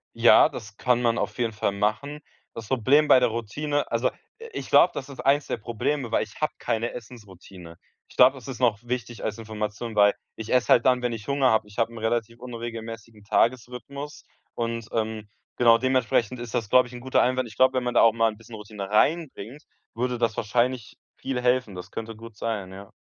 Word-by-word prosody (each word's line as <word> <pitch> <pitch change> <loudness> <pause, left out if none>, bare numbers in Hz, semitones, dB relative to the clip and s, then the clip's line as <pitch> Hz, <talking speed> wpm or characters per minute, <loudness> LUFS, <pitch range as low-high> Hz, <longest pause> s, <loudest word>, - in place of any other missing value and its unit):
Ja, - - +6
das 100 -1 -9
kann 125 +2 +1
man 120 -1 +1
auf - - -3
jeden 115 -2 -1
Fall 100 -1 -1
machen. 110 +9 -2 0.3
Das 115 -2 -8
Problem 135 +5 +3
bei 130 - +7
der 125 - +3
Routine 145 +7 -2
also 120 +2 +1
i - - -16 0.4
ich - - -6
glaube, - - +6
das 135 - -5
ist 140 - -12
eins 140 +1 +2
der - - -2
Probleme, 120 +3 -3
weil - - +2
ich 110 - -13
habe 155 - +1
keine 115 +1 -2
Essensroutine. 95 -7 -12 0.3
Ich - - -19
glaube, 130 +2 +7
das 130 0 -12
ist 130 - -6
noch 115 -5 +2
wichtig 120 -2 -5
als 110 0 -3
Information, 110 0 -5
weil 100 0 +5 0.2
ich 110 0 -7
esse 125 -1 +2
halt 120 - +5
dann, 125 -1 +3
wenn 120 -1 0
ich 110 -3 -8
Hunger 140 -2 +2
habe. 110 -1 +1
Ich 105 - -16
habe 115 0 0
'n 115 - -10
relativ 115 +1 -2
unregelmäßigen 115 -3 -8
Tagesrhythmus 130 +7 -2 0.3
und, 115 -1 -3
ähm, 110 -1 -3 0.3
genau 115 -1 +5
dementsprechend 125 -1 0
ist 120 -1 -7
das, 110 -4 -2
glaube 125 -1 +5
ich, - - -15
'n 120 - -7
guter 130 +1 +2
Einwand. 130 0 +1
Ich 110 - -13
glaub, 130 0 +5
wenn 130 -1 0
man 125 - -2
da - - +5
auch 115 - +6
mal 115 0 +2
'n 110 - -9
bisschen 115 0 -12
Routine 105 -2 -8
reinbringt, 145 +1 0 0.3
würde 125 +1 -2
das 115 -2 0
wahrscheinlich 120 +1 -1 0.2
viel 135 -2 -4
helfen. 125 -4 +1
Das 90 - -8
könnte 115 0 -6
gut 115 -1 -12
sein, 100 -4 -4
ja. 100 +1 -11
115 Hz, 215 wpm, -25 LUFS, 110-125 Hz, 0.4 s, bei